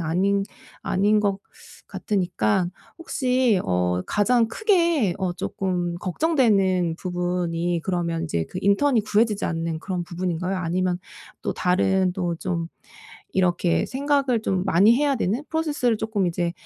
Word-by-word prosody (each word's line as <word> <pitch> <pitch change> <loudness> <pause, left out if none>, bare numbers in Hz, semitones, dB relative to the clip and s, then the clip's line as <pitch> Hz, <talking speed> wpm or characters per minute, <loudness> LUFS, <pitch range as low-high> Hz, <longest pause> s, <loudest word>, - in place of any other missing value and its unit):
아닌 195 +5 +1 0.4
아닌 205 +3 +2
것 200 -2 0 0.5
같으니까 180 - 0 0.3
혹시 255 - +1
어 90 0 0
가장 230 +3 +2
크게 335 - +2
어 185 -2 -1
쪼끔 175 -1 -2
걱정되는 190 - +1
부분이 175 -1 -1
그러면 170 -3 -1
이제 85 - -1
그 185 - -6
인턴이 220 +4 +3
구해지지 215 0 +1
않는 165 -1 -3
그런 180 -3 -3
부분인가요? 180 +1 -3
아니면 180 +1 -1 0.4
또 - - -1
다른 185 0 +1
또 175 -3 -2
좀 170 -2 -3 0.7
이렇게 175 -2 +1
생각을 270 -4 0
좀 190 -3 0
많이 195 +5 +5
해야 285 -1 +1
되는 225 +6 -1
프로세스를 295 -8 0
쪼끔 215 -4 -1
이제 170 0 -1
185 Hz, 280 characters per minute, -24 LUFS, 175-225 Hz, 0.7 s, 많이